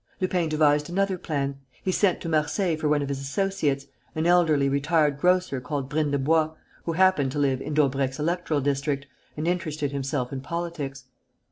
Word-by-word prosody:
Lupin 180 -3 0
devised 150 -1 +3
another 195 +2 +1
plan. 140 -5 -3 0.2
He 185 - +1
sent 185 0 +2
to - - -5
Marseilles 160 +2 +1
for 150 - +1
one 145 -1 +2
of - - -3
his 140 -1 -2
associates, 140 -2 -1 0.3
an 160 +1 0
elderly 165 -5 +4
retired 145 +1 +2
grocer 180 -6 +2
called 135 +1 -4
Brindebois, 155 +1 +1 0.3
who 165 - -1
happened 175 -6 +3
to - - -4
live 135 -2 +1
in 150 +2 -4
Daubrecq's 135 -2 +1
electoral 165 -1 0
district 140 0 -1 0.3
and 155 +2 -2
interested 155 -5 -1
himself 135 -2 -2
in 135 - -4
politics. 150 -4 -4
150 Hz, 165 wpm, -26 LUFS, 140-170 Hz, 0.3 s, elderly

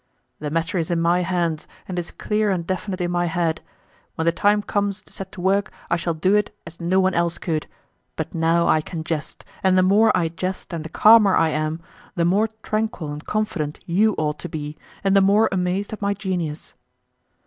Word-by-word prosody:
"The 150 - -3
matter 165 +4 -1
is 160 - -2
in 170 -1 +1
my 170 +2 +3
hands 170 -3 -1 0.2
and 180 -1 -3
is 175 - -5
clear 210 0 -1
and 180 -4 -1
definite 185 +1 -3
in 175 0 -1
my 175 0 +1
head. 165 -1 -1 0.5
When 160 - -2
the 170 - +4
time 205 +4 +2
comes 200 -1 -1
to - - -18
set 195 -1 -7
to 190 - -7
work 195 +2 +1 0.2
I - - +5
shall 170 -1 -2
do 185 +5 +2
it 210 0 +2
as 165 +1 -11
no 180 +3 +2
one 190 0 +2
else 170 0 0
could, 160 -3 -2 0.5
but - - -4
now 165 +1 +2
I 155 - +4
can 160 +1 -6
jest, 160 -2 -5 0.2
and 190 -1 +3
the 185 - +5
more 205 +4 +5
I 165 -2 +1
jest 185 +2 -5
and 165 -2 -3
the 160 - -7
calmer 215 -1 +6
I 165 - +3
am 155 +1 -2 0.3
the 170 - +1
more 200 +6 +3 0.2
tranquil 215 -8 -2
and 150 +1 -8
confident 185 -9 -2
you 205 +5 +2
ought 150 -1 -1
to - - -6
be, 150 -1 -5 0.3
and 195 0 +3
the 195 - +6
more 200 +3 +4
amazed 190 +2 -1
at 215 - -7
my 200 0 0
genius." 180 -6 -4
180 Hz, 215 wpm, -22 LUFS, 165-195 Hz, 0.5 s, calmer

